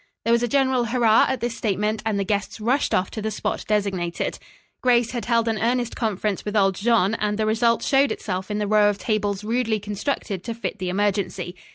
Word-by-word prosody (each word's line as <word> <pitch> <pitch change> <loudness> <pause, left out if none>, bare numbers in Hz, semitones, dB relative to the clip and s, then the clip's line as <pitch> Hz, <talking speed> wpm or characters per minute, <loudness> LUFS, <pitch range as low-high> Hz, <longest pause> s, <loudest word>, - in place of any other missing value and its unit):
There 230 - +2
was 235 - +3
a 240 - +1
general 260 -1 +2
hurrah 230 -2 +4
at 265 -2 -2
this 235 -1 -2
statement, 210 0 -1
and 215 -2 0
the 200 - 0
guests 200 +2 -2
rushed 245 +6 +1
off 185 - +1
to 215 - -5
the 220 - -1
spot 210 - -3
designated. 195 -5 -1 0.4
Grace 240 -2 +3
had 240 -2 -4
held 230 -1 +2
an 225 -1 0
earnest 240 +1 0
conference 210 -3 -2
with 210 +1 -4
old 195 -1 +4
Jean, 215 0 +2
and 210 -1 -1
the 220 - 0
result 225 +2 +2
showed 275 0 +3
itself 185 -2 -4
in 210 - -2
the 210 - -1
row 210 0 +4
of 205 - -2
tables 205 -2 -1
rudely 225 0 0
constructed 205 -1 -3
to 230 -1 -4
fit 225 -2 -5
the 185 -1 -2
emergency. 195 -2 -1
215 Hz, 215 wpm, -23 LUFS, 200-235 Hz, 0.4 s, hurrah